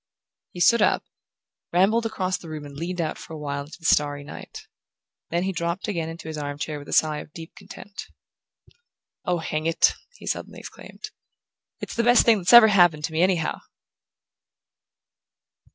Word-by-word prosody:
He 175 - -8
stood 235 +5 +5
up, - - +2 0.7
rambled 215 +6 +3
across 190 -4 -2
the 165 - -11
room 155 -2 -7
and 140 -1 -11
leaned 175 +4 -5
out 160 -2 -2
for - - -10
a - - -6
while 140 -1 -4
into 150 - -12
the 165 - -16
starry 145 -1 +2
night. 145 - -10 0.6
Then 170 +1 0
he 190 - -1
dropped 170 +1 -3
again 170 -6 -2
into 165 0 -9
his 155 -1 -5
armchair 145 +1 -4
with 145 - -12
a - - -7
sigh 155 -1 +2
of - - -11
deep 165 0 -10
content. 205 0 -10 1.2
"Oh, 180 -1 +1
hang 155 -1 -3
it," 165 - +3 0.2
he - - -13
suddenly - - -4
exclaimed, - - -10 0.7
"it's - - -6
the 235 - +2
best 240 0 +5
thing 225 -3 +5
that's 180 0 +1
ever 235 -2 +10
happened 175 -6 +4
to 160 - -2
me, 160 - +1
anyhow!" 180 -3 +1
170 Hz, 175 wpm, -24 LUFS, 155-185 Hz, 1.2 s, ever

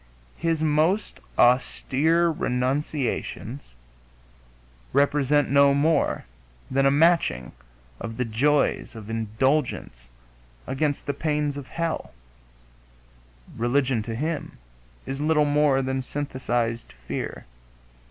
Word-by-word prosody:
His 165 -2 0
most 160 +7 +1 0.2
austere 145 +6 +3
renunciations 130 - -2 1.2
represent 145 +1 +2
no 140 0 +5
more 155 +3 +1 0.5
than 135 +1 +3
a - - +6
matching 145 - +2 0.5
of 115 -1 -6
the 125 - 0
joys 140 +4 +1
of 110 -1 -8
indulgence 115 - -1 0.6
against 145 +1 -1
the 140 - -1
pains 150 -1 -1
of 140 -2 -7
hell; 165 - -3 1.4
religion, 125 0 +1
to 115 +1 -5
him, 155 +5 -3 0.5
is 135 +2 -4
little 150 0 +3
more 145 -2 +3
than 130 0 -1
synthesized 120 -4 -2
fear.... - - -6
140 Hz, 95 wpm, -25 LUFS, 120-150 Hz, 1.4 s, a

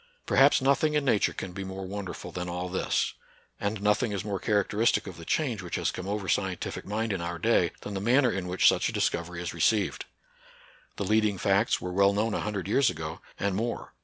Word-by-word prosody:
Perhaps 135 0 +5
nothing 145 +3 +3
in 150 -2 +1
Nature 110 -6 +3
can 95 - -6
be 100 +1 -5
more 95 0 -6
won 100 +1 -5
derful 90 - -7
than 90 0 -4
all 90 +1 -3
this; 95 - 0 0.5
and 100 0 -2
nothing 105 +2 +2
is 100 -1 -3
more 100 -2 -2
char 105 0 +2
acteristic 110 +4 +1
of 95 - -7
the 85 - -10
change 125 - 0
which 90 - -5
has - - 0
come 90 - -6
over 100 -1 -3
scientific 95 -2 -2
mind 110 +1 -1
in 95 - -3
our 85 0 -3
day - - +3
than 105 - -6
the 95 - -3
manner 125 +3 +4
in 95 -3 -3
which 90 +1 +3
such - - +3
a - - -6
discovery 85 +1 -1
is 85 - -4
received. 95 +4 +1 0.9
The 100 - -3
lead 110 +2 +3
ing 100 -2 0
facts 100 +5 +2
were 90 0 -5
well 100 +1 +4
known 105 +2 0
a - - -1
hundred 100 -3 -3
years 120 +4 +3
ago, 80 +2 -6 0.2
and 100 -1 0
more. 115 +4 -3
100 Hz, 225 wpm, -28 LUFS, 90-110 Hz, 0.9 s, Perhaps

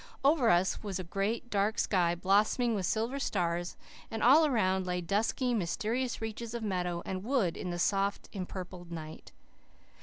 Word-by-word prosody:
Over 280 -5 +4
us 175 +2 +2
was 200 -4 -3
a 185 - -4
great, 200 +7 -2
dark 210 +2 +1
sky, 175 -3 +2
blossoming 210 +6 +2
with 190 -4 -1
silver 230 +5 -1
stars, 175 -7 -1 0.3
and 225 - -3
all 300 +6 +7
around 190 -8 +1
lay 180 0 -1
dusky, 215 +7 0
mysterious 225 +5 -1
reaches 225 +1 -5
of 235 - -4
meadow 180 -4 -2
and 185 0 -4
wood 225 -8 +1
in 180 - -5
the 175 - -3
soft, 195 +2 0
empurpled 180 -2 -7
night. 155 -2 -8
195 Hz, 160 wpm, -31 LUFS, 180-230 Hz, 0.3 s, all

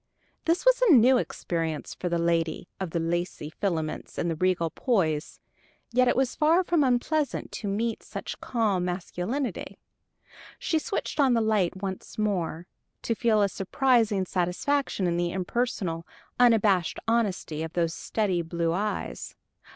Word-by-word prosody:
This 335 +6 +1
was - - +5
a 465 -9 +6
new 250 +2 +6
experience 165 -7 -3
for 180 - -4
the 170 - +1
lady 170 0 0
of 190 -2 -3
the 170 - -1
lacy 165 -2 -2
filaments 165 -5 -3
and 165 -1 -2
regal 180 -3 +2
poise; 165 - 0 0.5
yet 250 +1 +3
it - - +3
was 260 -1 +1
far 325 +4 +4
from 340 -4 +2
unpleasant 270 +3 0
to 210 - -5
meet 225 +3 -1
such - - -7
calm 210 -7 0
masculinity. 185 +8 -3 0.8
She 320 - 0
switched 315 - -4
on 265 -4 +5
the - - +3
light 205 -4 +1
once 190 -1 -5
more, 180 -5 -1 0.4
to 230 - 0
feel 220 -2 +2
a - - +4
surprising 210 0 +1
satisfaction 185 +6 0
in 170 -1 +1
the 175 0 0
impersonal, 185 -3 -2 0.3
unabashed 210 -7 +4
honesty 205 -9 0
of 160 0 -5
those 165 -2 0
steady 190 -5 -1
blue 170 0 -1
eyes. 210 +4 -3
195 Hz, 145 wpm, -27 LUFS, 170-240 Hz, 0.8 s, a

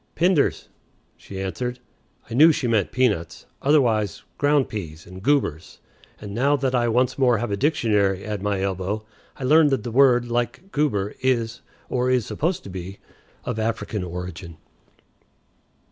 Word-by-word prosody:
"Pinders," 170 -3 +2 0.5
she 95 - -9
answered. 125 +6 -3 0.5
I 115 - -8
knew 155 +7 +7
she 145 - -2
meant 110 -5 +1
peanuts, 100 -11 0 0.2
otherwise 115 - +2 0.2
"ground 145 -1 +3
peas" 80 -7 -7
and 95 +1 -11
"goobers," 130 - 0 0.4
and 105 -2 -8
now 140 +6 +2
that 135 -2 -1
I 120 -1 +2
once 125 +3 +1
more 125 -3 +4
have 110 0 -3
a - - +1
dictionary 105 - +1
at 105 -2 -4
my 100 -1 -1
elbow 95 +2 -2 0.3
I - - -7
learn 155 +4 +5
that 135 -6 0
the 120 - -4
word, 125 -1 +4
like 120 - -3
"goober," 105 -9 0
is, 120 -3 0 0.3
or 125 0 0
is 125 -4 +2
supposed 170 +4 -2
to - - -9
be, 95 +1 -7 0.5
of 120 -3 -3
African 110 -2 -2
origin. 90 -1 -7
115 Hz, 155 wpm, -23 LUFS, 100-130 Hz, 0.5 s, knew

